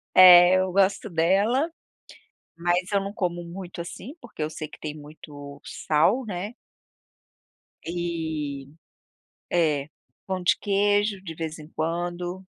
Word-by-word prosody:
É, 180 Hz, 0 st, +9 dB
eu 185 Hz, -1 st, 0 dB
gosto 195 Hz, +2 st, +2 dB
dela, 200 Hz, -, +2 dB, 0.9 s
mas 175 Hz, +2 st, 0 dB
eu 200 Hz, -, +3 dB
não 195 Hz, +1 st, -5 dB
como 175 Hz, -4 st, -2 dB
muito 175 Hz, 0 st, -8 dB
assim, 205 Hz, -, -8 dB
porque 155 Hz, -, -8 dB
eu 150 Hz, -, -1 dB
sei 155 Hz, 0 st, -6 dB
que -, -, -14 dB
tem 150 Hz, -1 st, -5 dB
muito 145 Hz, -1 st, -11 dB
sal, 175 Hz, +12 st, +1 dB
né? 200 Hz, +3 st, -5 dB, 1.3 s
E 160 Hz, -5 st, -3 dB, 0.9 s
É. 155 Hz, -4 st, +1 dB, 0.4 s
Pão 190 Hz, -1 st, -3 dB
de 175 Hz, -, +3 dB
queijo, 205 Hz, 0 st, +1 dB
de 165 Hz, -4 st, -7 dB
vez 160 Hz, 0 st, -5 dB
em 155 Hz, -, -10 dB
quando, 175 Hz, +3 st, -3 dB
175 Hz, 130 wpm, -25 LUFS, 160-195 Hz, 1.3 s, É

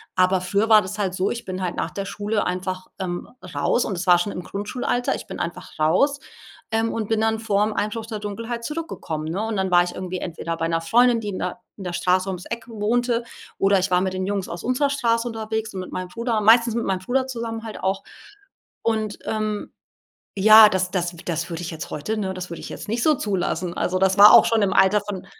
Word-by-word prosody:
Aber 185 Hz, 0 st, +3 dB
früher 200 Hz, +4 st, 0 dB
war 215 Hz, -1 st, +8 dB
das 195 Hz, +2 st, -6 dB
halt 195 Hz, -3 st, -1 dB
so: 185 Hz, +1 st, 0 dB
Ich 235 Hz, 0 st, -4 dB
bin 185 Hz, 0 st, -5 dB
halt 180 Hz, -1 st, -2 dB
nach -, -, -3 dB
der 200 Hz, -, -4 dB
Schule 205 Hz, +1 st, -2 dB
einfach, 185 Hz, +1 st, -3 dB
ähm, 175 Hz, -2 st, -4 dB, 0.3 s
raus 240 Hz, -, +1 dB
und 195 Hz, -, -3 dB
es 180 Hz, -, -4 dB
war 175 Hz, -1 st, +7 dB
schon 175 Hz, +4 st, -1 dB
im 180 Hz, -, -6 dB
Grundschulalter. 245 Hz, +6 st, -2 dB
ich -, -, -7 dB
bin -, -, -6 dB
einfach 170 Hz, -, -6 dB
raus, 185 Hz, -, +2 dB, 0.5 s
ähm, 225 Hz, +1 st, 0 dB
und 220 Hz, -2 st, -3 dB
bin 225 Hz, -1 st, +1 dB
dann 220 Hz, 0 st, +1 dB
vorm 210 Hz, -1 st, +1 dB
Einbruch 215 Hz, +2 st, -2 dB
der 220 Hz, -2 st, -5 dB
Dunkelheit 230 Hz, +3 st, -5 dB
zurückgekommen, 265 Hz, -, -4 dB
ne? 185 Hz, +5 st, -2 dB
Und 225 Hz, -2 st, -2 dB
dann 190 Hz, -1 st, -1 dB
war 175 Hz, 0 st, +6 dB
ich 175 Hz, -, -5 dB
irgendwie 185 Hz, 0 st, -5 dB
entweder 165 Hz, -1 st, -4 dB
bei 165 Hz, 0 st, -2 dB
'ner 165 Hz, 0 st, +1 dB
Freundin, 235 Hz, +7 st, +3 dB
die 215 Hz, -, -6 dB
in 190 Hz, -, -4 dB
der 180 Hz, +5 st, -3 dB, 0.2 s
in 200 Hz, -, -9 dB
der 180 Hz, -, -4 dB
Straße 185 Hz, +2 st, +1 dB
ums 185 Hz, -1 st, -5 dB
Eck 235 Hz, -1 st, -5 dB
wohnte 235 Hz, +2 st, 0 dB, 0.3 s
oder 195 Hz, 0 st, +3 dB
ich 185 Hz, 0 st, -1 dB
war 180 Hz, -, +4 dB
mit 190 Hz, 0 st, -1 dB
den 185 Hz, 0 st, -2 dB
Jungs 200 Hz, -1 st, -2 dB
aus 170 Hz, -, -7 dB
unserer 255 Hz, +4 st, +1 dB
Straße 235 Hz, -4 st, +1 dB
unterwegs 220 Hz, -1 st, -4 dB
und 190 Hz, -, -4 dB
mit 185 Hz, -, -9 dB
meinem 185 Hz, 0 st, -4 dB
Bruder 230 Hz, +3 st, -1 dB
meistens 230 Hz, +2 st, +5 dB
mit 235 Hz, -, -1 dB
meinem 190 Hz, -1 st, 0 dB
Bruder 260 Hz, +7 st, -1 dB
zusammen 230 Hz, -3 st, -5 dB
halt 220 Hz, -, -7 dB
auch. 190 Hz, +1 st, 0 dB, 0.8 s
Und, 215 Hz, -2 st, -1 dB
ähm, 215 Hz, -1 st, -2 dB, 0.7 s
ja, 215 Hz, +2 st, +9 dB
das 185 Hz, -2 st, -1 dB
das 175 Hz, -2 st, -2 dB
das 170 Hz, 0 st, -2 dB
würde 165 Hz, 0 st, -5 dB
ich 175 Hz, -, -5 dB
jetzt 160 Hz, -1 st, -7 dB
heute, 215 Hz, +9 st, -3 dB
ne 190 Hz, -3 st, -2 dB
das 185 Hz, -1 st, -6 dB
würde 170 Hz, -, -7 dB
ich -, -, -8 dB
jetzt -, -, -8 dB
nicht 230 Hz, +2 st, -1 dB
so 310 Hz, -1 st, +4 dB
zulassen. 185 Hz, -, -2 dB
Also 185 Hz, +1 st, 0 dB
das 190 Hz, +1 st, +2 dB
war 205 Hz, +2 st, +10 dB
auch 235 Hz, -, +9 dB
schon 225 Hz, -1 st, +2 dB
im 195 Hz, -, +1 dB
Alter 195 Hz, +2 st, +5 dB
von 200 Hz, -2 st, -6 dB
205 Hz, 235 wpm, -23 LUFS, 185-225 Hz, 0.8 s, war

